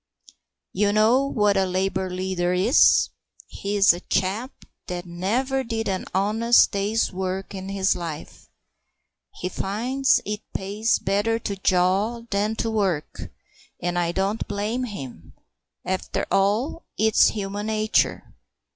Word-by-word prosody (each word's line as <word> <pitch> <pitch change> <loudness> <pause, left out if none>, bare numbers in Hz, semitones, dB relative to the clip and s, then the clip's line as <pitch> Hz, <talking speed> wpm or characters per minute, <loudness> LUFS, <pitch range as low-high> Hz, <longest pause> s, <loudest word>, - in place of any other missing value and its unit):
You 205 -1 +2
know 225 +6 +3
what 210 -6 +2
a 190 -1 +2
Labour 185 0 -1
leader 180 -1 -1
is. 200 - +5 0.4
He's 200 -2 +2
a 175 - -6
chap 195 +9 -2 0.2
that 175 0 -5
never 235 +10 -1
did 225 -2 -3
an 190 -1 -2
honest 220 +5 +3
day's 205 +2 0
work 190 +1 -4
in 190 0 -6
his 195 0 +1
life. 165 -4 -7 0.9
He 180 - -4
finds 245 +9 +1
it 210 +1 -3
pays 205 +4 0
better 205 +4 0
to 200 - -3
jaw 190 +5 +1
than 205 +2 0
to 225 0 -2
work, 190 -8 -2 0.5
and 175 0 -1
I 170 -1 0
don't 195 +4 -1
blame 210 +5 -2
him. 135 - -9 0.5
After 185 0 -2
all, 210 +12 +1
it's 220 0 +5
human 205 0 -3
nature. 215 0 +1
200 Hz, 130 wpm, -24 LUFS, 185-220 Hz, 0.9 s, is